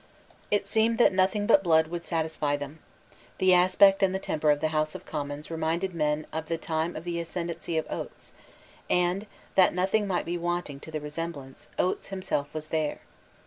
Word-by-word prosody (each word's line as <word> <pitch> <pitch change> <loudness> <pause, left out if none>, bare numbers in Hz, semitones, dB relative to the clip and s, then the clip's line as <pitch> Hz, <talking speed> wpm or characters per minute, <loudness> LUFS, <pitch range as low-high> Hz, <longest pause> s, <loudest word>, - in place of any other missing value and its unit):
It 205 -1 +1
seemed 225 +2 +2
that 240 - +5
nothing 190 +2 +2
but 195 - +6
blood 160 -2 +4
would 170 0 -5
satisfy 160 -3 0
them. 145 +2 -7 0.6
The 185 -1 +4
aspect 185 +2 +6
and 190 -1 +3
the - - -1
temper 155 -4 0
of 145 -1 +4
the 155 +1 0
House 155 0 0
of - - -8
Commons 145 0 -5
reminded 165 +3 -1
men 150 -1 0
of 160 0 -3
the 165 - -1
time 160 +1 -2
of 155 - -6
the 170 -1 -3
ascendency 170 -1 -3
of 160 - 0
Oates; - - -7 0.6
and, 180 +4 +1 0.3
that 185 -2 +5
nothing 195 +3 +1
might 185 -2 0
be 175 +1 -2
wanting 175 -4 -2
to 160 - -11
the 155 -1 -3
resemblance, 150 -3 -6
Oates 180 - 0
himself 185 -7 -1
was 155 -1 -6
there. 155 -2 -1
170 Hz, 185 wpm, -28 LUFS, 155-185 Hz, 0.6 s, but